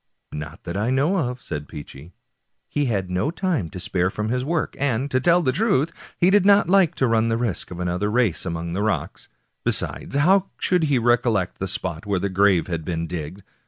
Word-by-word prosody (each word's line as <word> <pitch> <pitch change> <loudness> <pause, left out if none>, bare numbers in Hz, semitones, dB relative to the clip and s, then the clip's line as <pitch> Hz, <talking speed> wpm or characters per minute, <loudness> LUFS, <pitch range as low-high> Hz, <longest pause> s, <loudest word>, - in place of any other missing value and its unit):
" - - -53
Not 75 0 -7
that 85 - -5
I 105 +4 0
know 140 +9 +2
of," 125 0 -8
said 75 0 -5
Peechy; 75 +2 -10 0.3
" - - -52
he 145 -1 -1
had 100 -7 -1
no 90 +10 0
time 170 - -1
to 90 - -8
spare 90 +1 0
from 105 +3 -3
his 125 +1 0
work, 160 +3 -1
and, 135 0 0
to 130 - +2
tell 175 +5 +3
the 130 - +2
truth, 165 - +1 0.3
he 180 +2 +4
did 205 -1 +5
not 200 -2 +5
like 190 -3 +4
to 130 - +1
run 115 0 +2
the 115 - +1
risk 115 -6 -2
of 90 - -8
another 90 +3 -1
race 110 -6 +1
among 85 -1 -4
the 100 - -1
rocks. 110 -1 -2 0.3
Besides, - - -1
how 185 +7 +3
should 180 -3 +1
he 145 -3 +2
recollect 115 -5 +1
the 95 - -2
spot 90 -2 -4
where 100 -2 +1
the 100 - -1
grave 95 -2 +3
had 85 -3 -4
been 85 0 -3
digged? 85 +3 -6
110 Hz, 220 wpm, -23 LUFS, 90-145 Hz, 0.3 s, did